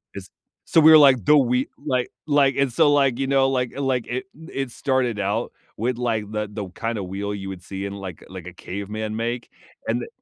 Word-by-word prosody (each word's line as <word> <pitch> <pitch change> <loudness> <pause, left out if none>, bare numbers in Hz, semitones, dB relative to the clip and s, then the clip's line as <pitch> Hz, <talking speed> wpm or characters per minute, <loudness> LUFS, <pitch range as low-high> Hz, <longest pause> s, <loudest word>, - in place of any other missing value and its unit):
It's - - -8 0.4
so, 165 - +5
we 155 - +8
were 160 - +10
like, 135 -6 +6
the 150 +10 +6
we 125 -1 +2 0.2
like 125 -1 0 0.2
like, 145 -3 +3
and 135 -3 +1
so, 145 - +4
like, 135 -3 +3
you 135 - 0
know, 135 -1 +3
like 125 0 -1
like, 130 -3 -1
it 130 +6 -3
it 135 -5 -6
started 125 -4 0
out 105 +4 -1 0.3
with, 120 +3 -1
like, 110 -4 -1
the 105 0 -2
the 105 -2 -5
kind 115 +5 -4
of 100 - -3
wheel 100 +2 -4
you 95 -1 -6
would 95 -2 -7
see 95 +1 -6
in, 100 - -5
like 95 -4 -8
like, 95 -2 -9
a 90 - -8
caveman 105 +4 -5
make, 120 +1 -3 0.4
and 115 +2 0
the - - -6
120 Hz, 225 wpm, -23 LUFS, 100-135 Hz, 0.4 s, were